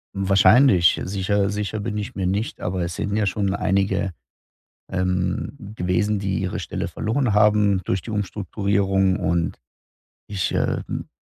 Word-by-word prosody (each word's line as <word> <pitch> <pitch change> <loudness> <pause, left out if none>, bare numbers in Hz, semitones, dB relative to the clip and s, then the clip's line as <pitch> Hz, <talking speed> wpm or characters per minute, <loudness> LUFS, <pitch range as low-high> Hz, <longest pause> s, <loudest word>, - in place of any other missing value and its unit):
Hm, 95 0 -2
wahrscheinlich. 100 -2 +5
Sicher 100 +1 0
sicher 105 +1 -3
bin 105 0 -3
ich 110 +4 -5
mir 95 - -2
nicht, 100 +5 -2
aber 90 0 -2
es 85 -1 -4
sind 100 0 -2
ja 105 -1 +1
schon 95 0 0
einige, 95 0 0 0.8
ähm, 90 0 -1 0.2
gewesen, 100 +2 0
die 95 -1 -1
ihre 95 -1 -3
Stelle - - -4
verloren 115 0 -1
haben 105 -2 +4
durch 95 -1 -1
die - - -8
Umstrukturierung. 100 -1 0
Und 85 0 -1 0.7
ich, 100 -3 -2
ähm, - - -2
100 Hz, 145 wpm, -23 LUFS, 95-105 Hz, 0.8 s, wahrscheinlich